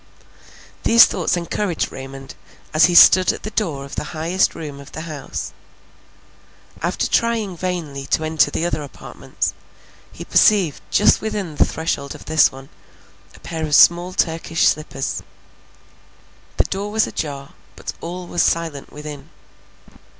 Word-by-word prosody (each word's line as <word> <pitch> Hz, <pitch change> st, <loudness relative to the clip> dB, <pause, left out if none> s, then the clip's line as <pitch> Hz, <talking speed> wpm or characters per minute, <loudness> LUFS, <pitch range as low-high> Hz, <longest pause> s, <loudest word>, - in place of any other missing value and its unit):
These 230 Hz, 0 st, +7 dB
thoughts 180 Hz, -1 st, -1 dB
encouraged 175 Hz, +1 st, -2 dB
Raymond, 135 Hz, 0 st, -9 dB, 0.4 s
as 155 Hz, 0 st, +6 dB
he 175 Hz, +1 st, +1 dB
stood 185 Hz, +2 st, +8 dB
at -, -, -9 dB
the 215 Hz, -, -5 dB
door 155 Hz, -12 st, -2 dB
of 140 Hz, -, -12 dB
the -, -, -4 dB
highest 175 Hz, +4 st, +1 dB
room 145 Hz, -3 st, -7 dB
of 140 Hz, 0 st, -13 dB
the 155 Hz, -, -6 dB
house. 155 Hz, -4 st, -6 dB, 1.3 s
After -, -, -1 dB
trying 225 Hz, -5 st, 0 dB
vainly 160 Hz, -6 st, -4 dB
to 160 Hz, -, 0 dB
enter 155 Hz, 0 st, +2 dB
the 165 Hz, -, -2 dB
other 175 Hz, -3 st, -1 dB
apartments, 145 Hz, -, -5 dB, 0.6 s
he -, -, -9 dB
perceived 190 Hz, -9 st, +3 dB
just 210 Hz, -, +4 dB
within 205 Hz, -7 st, -4 dB
the -, -, +4 dB
threshold 145 Hz, -3 st, -3 dB
of -, -, -13 dB
this 155 Hz, -1 st, +4 dB
one, 135 Hz, 0 st, -12 dB, 0.7 s
a -, -, -16 dB
pair 160 Hz, -2 st, -5 dB
of 150 Hz, -2 st, +1 dB
small 175 Hz, +3 st, +5 dB
Turkish 165 Hz, -2 st, +1 dB
slippers; 150 Hz, -3 st, -2 dB, 1.4 s
the -, -, +4 dB
door 200 Hz, +2 st, -4 dB
was 215 Hz, +1 st, +2 dB
ajar, 140 Hz, -2 st, -5 dB, 0.2 s
but -, -, -7 dB
all 180 Hz, +2 st, -6 dB
was 175 Hz, 0 st, -1 dB
silent 165 Hz, -4 st, -1 dB
within. 150 Hz, -1 st, -9 dB
160 Hz, 145 wpm, -20 LUFS, 145-180 Hz, 1.4 s, stood